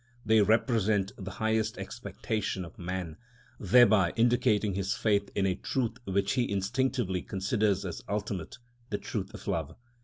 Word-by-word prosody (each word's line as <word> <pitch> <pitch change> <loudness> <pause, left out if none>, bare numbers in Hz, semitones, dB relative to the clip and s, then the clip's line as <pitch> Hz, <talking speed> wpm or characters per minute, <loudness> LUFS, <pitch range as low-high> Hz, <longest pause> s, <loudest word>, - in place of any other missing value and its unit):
They 110 0 +5
represent 110 -2 +2
the 95 -1 -7
highest 110 +3 0
expectation 105 -4 -4
of 95 +7 -14
man, 90 -2 -4 0.4
thereby 100 -3 +5
indicating 115 -3 +2
his 95 +1 -1
faith 100 -2 +1
in 100 - +2
a 95 - +2
truth 120 +4 -2
which 100 +1 0
he 125 -4 0
instinctively 100 -1 0
considers 100 0 0
as 90 - -5
ultimate—the 105 +3 -5
truth 100 -1 -4
of - - -11
love. - - -2
105 Hz, 140 wpm, -29 LUFS, 95-115 Hz, 0.4 s, They